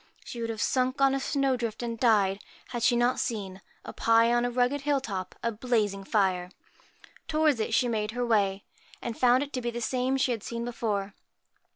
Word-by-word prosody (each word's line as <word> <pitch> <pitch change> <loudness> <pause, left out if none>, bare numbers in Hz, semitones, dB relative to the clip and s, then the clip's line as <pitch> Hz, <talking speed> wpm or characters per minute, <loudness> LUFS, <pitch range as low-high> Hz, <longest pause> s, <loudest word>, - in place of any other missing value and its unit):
She 235 - -7
would 230 - -2
have 225 -1 -2
sunk 255 +1 0
on 275 -1 +4
a 275 - 0
snow 275 -1 +1
drift 235 -1 -4
and 230 -1 -4
died, 205 -5 +3 0.3
had 240 -2 -4
she 245 +1 +4
not 240 +1 +2
seen, 195 -6 -3 0.2
up - - -9
high 230 +1 +4
on 240 0 +2
a - - 0
rugged 250 +3 +1
hill 285 -1 +1
top, 190 -8 -5
a 235 - +1
blazing 210 -4 -1
fire. 185 -4 +1 0.8
Towards 310 -5 +2
it 220 +1 0
she 250 - +3
made 215 -3 -1
her 245 +2 -2
way, 200 -4 +1 0.4
and 235 - -5
found 250 +2 +4
it 290 - -9
to 255 - -2
be 240 - -2
the 235 0 -4
same 255 +3 0
she 260 -1 +1
had 230 -3 -2
seen 235 +2 -5
before. 210 -4 -2
235 Hz, 210 wpm, -28 LUFS, 215-255 Hz, 0.8 s, on